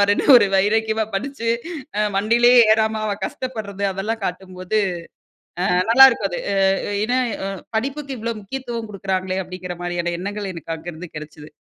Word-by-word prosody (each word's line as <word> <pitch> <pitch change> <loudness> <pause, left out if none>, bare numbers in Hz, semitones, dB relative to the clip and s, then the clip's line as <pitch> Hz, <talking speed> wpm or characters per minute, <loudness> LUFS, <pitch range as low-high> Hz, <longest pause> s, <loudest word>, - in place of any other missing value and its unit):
பாரு? 200 - +1
ன்னு - - -1
ஒரு 205 -4 +5
வைராக்கியமா 220 +2 +1
படிச்சு 230 +2 -3 0.5
அ - - +3
வண்டியிலே 235 +4 +4 0.2
ஏறாம 220 0 +1
அவ 205 - -1
கஷ்டப்படுறது, 215 -6 -5
அதெல்லாம் 215 +4 -3
காட்டும்போது 185 +2 -3 1.0
அ - - +3
நல்லாயிருக்கும். 245 -5 +7
அது - - -3
அ - - 0 0.5
ஏன்னா, 250 +3 +1 0.3
அ - - -2 0.3
படிப்புக்கு 275 +3 -3
இவ்வளோ 230 +1 -2
முக்கியத்துவம் 235 0 -6
குடுக்குறாங்களே 190 -1 -2
அப்படிங்கிற 180 0 -7
மாரியான 175 -1 -2
எண்ணங்கள் 200 +1 -4
எனக்கு 165 0 -6
அங்கருந்து 170 +1 -8
கிடைச்சது. 150 0 -10
205 Hz, 145 wpm, -21 LUFS, 185-230 Hz, 1.0 s, நல்லாயிருக்கும்